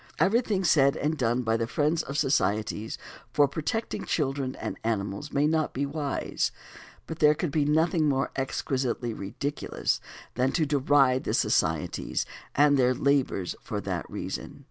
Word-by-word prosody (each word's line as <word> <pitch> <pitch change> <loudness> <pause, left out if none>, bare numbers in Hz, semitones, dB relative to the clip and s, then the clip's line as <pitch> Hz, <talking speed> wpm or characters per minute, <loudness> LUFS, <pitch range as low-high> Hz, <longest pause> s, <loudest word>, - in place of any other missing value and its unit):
Everything 210 -2 +2
said 145 -4 +4
and 150 +2 0
done 125 -2 0
by 110 -1 +1
the 115 0 -1
friends 150 +6 +1
of 140 - -7
the 150 - +2
societies 110 -3 0 0.3
for 145 -1 +4
protecting 165 +10 -3
children 135 -3 -1
and - - -5
animals 105 +3 -2
may 145 +1 +2
not 155 0 +1
be 140 +2 -1
wise; 145 0 -2 0.5
but 160 - -7
there 150 0 +5
could 165 -1 -2
be 150 0 +1
nothing 155 +1 +2
more 135 -1 0
exquisitely 130 -3 -2
ridiculous 125 +9 -2 0.3
than 130 +2 +1
to 160 - +2
deride 140 -2 +3
the - - -1
societies - - 0 0.3
and 145 0 +5
their 125 0 +3
labors 130 -9 +1
for - - -4
that - - -4
reason. - - -5
140 Hz, 155 wpm, -27 LUFS, 125-150 Hz, 0.5 s, there